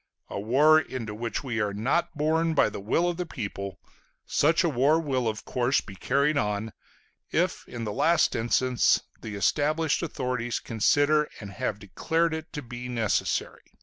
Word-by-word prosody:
A - - -3
war 145 +9 +5
into 120 -8 -5
which 115 +2 -4
we 120 -4 -2
are 100 -1 -1
not 140 +9 0
borne 160 +2 +1
by 140 - +4
the 105 - -7
will 115 - +1
of 175 -1 -2
the 180 - -2
people 100 - -5 0.5
such 160 +5 +2
a 170 - +2
war 145 +4 +3
will 130 -6 -1
of 110 -1 -3
course 125 +1 +1
be 100 - -9
carried 140 +8 +1
on, 105 +1 -2 0.6
if - - -1
in 120 -1 -6
the 105 -2 -3
last 170 +9 +3
instance 120 +2 +2 0.2
the 105 -2 -6
established 150 +8 +1
authorities 125 -7 -2
consider 145 +7 +2
and 100 -2 -8
have 110 0 -3
declared 160 - -1
it 160 0 -6
to 150 -2 -5
be 120 +1 -7
necessary. 115 -4 -2
125 Hz, 170 wpm, -27 LUFS, 110-155 Hz, 0.6 s, war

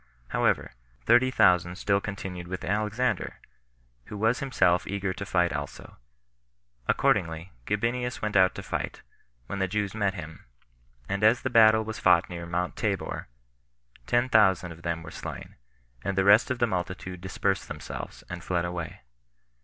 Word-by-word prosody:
However, - - +1 0.3
thirty 120 +2 +5
thousand 90 -7 +3
still 100 +1 +1
continued 95 -4 -6
with 95 +1 -5
Alexander, 105 +2 -1 0.7
who 105 - -8
was 110 +4 +2
himself 90 -10 +2
eager 100 -1 -2
to 100 +1 -7
fight 90 -2 +2
also; 75 -2 -7 0.9
accordingly, 80 +2 +1 0.2
Gabinius 120 +4 -1
went 105 -1 -3
out 95 -1 +5
to - - -6
fight, - - -4 0.4
when 100 - -5
the 95 - +1
Jews 105 +1 -2
met 100 -3 0
him; 80 -3 -9 0.6
and 100 +1 -2
as 110 +3 +5
the 130 - -1
battle 110 -1 +6
was 110 0 -6
fought 90 0 +4
near 85 -1 -6
Mount 90 +1 -2
Tabor, 100 -3 -2 0.8
ten 120 +1 +2
thousand 95 -7 +4
of 85 0 -11
them 85 -1 -3
were 80 - -9
slain, - - -8 0.5
and 100 -1 -2
the 95 - +4
rest 105 +3 +6
of 130 - -1
the 120 - +3
multitude 90 -2 -4
dispersed 95 +1 -1
themselves, - - -7
and 85 +4 -7
fled 90 -1 0
away. 85 -5 -5
95 Hz, 155 wpm, -27 LUFS, 90-110 Hz, 0.9 s, battle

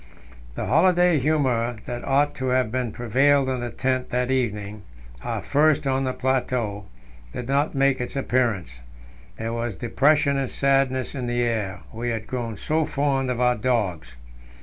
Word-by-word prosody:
The - - -3
holiday 175 +3 +4
humour 130 -5 +1
that 120 0 -5
ought 140 +2 +2
to 130 - -4
have 125 -3 +1 0.2
prevailed 135 +5 +2
in 130 -1 -1
the 120 0 -3
tent 130 +1 -1
that 125 0 0
evening 105 -5 -2 0.4
our - - -3
first 150 +1 +2
on 135 0 +1
the 130 - 0
plateau 125 -6 -1 0.5
did 125 - -5
not 140 +3 +1
make 135 -1 +2
its 125 - -5
appearance; 115 - -1 0.6
there 115 +1 -3
was 115 -2 -3
depression 140 +5 +2
and 135 -2 -1
sadness 135 -2 +1
in 125 -3 -4
the 120 0 0
air 105 -5 -2
we 120 +2 -3
had 110 -2 -3
grown 115 -4 -4
so 160 +1 0
fond 140 -3 0
of 125 -1 -2
our 125 0 +4
dogs. 105 - -1
125 Hz, 160 wpm, -24 LUFS, 115-135 Hz, 0.6 s, holiday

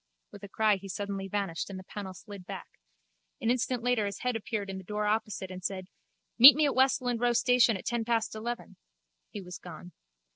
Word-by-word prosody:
With - - -12
a 200 - -8
cry 215 0 +2
he 195 +1 -10
suddenly 200 0 -4
vanished 195 -4 -3
and 195 - -6
the 185 - -9
panel 190 -1 -7
slid 200 -2 -11
back. - - -9 0.6
An 230 - +1
instant 250 -1 -1
later 245 -4 +1
his 200 - -5
head 250 -1 -1
appeared 215 -2 -3
in 190 -1 -5
the - - -10
door 210 +3 -3
opposite 210 -3 -2
and 185 0 -8
said: 185 -1 -4 0.5
Meet 260 +3 +12
me 305 0 +3
at 285 - +1
Westland 260 -2 +2
Row 245 0 +3
station 245 -2 +4
at - - -12
ten 235 -1 -1
past 230 -1 0
eleven. 235 +2 -6 0.5
He 205 - -7
was 180 -1 -9
gone. 175 0 -11
210 Hz, 210 wpm, -29 LUFS, 195-240 Hz, 0.6 s, Meet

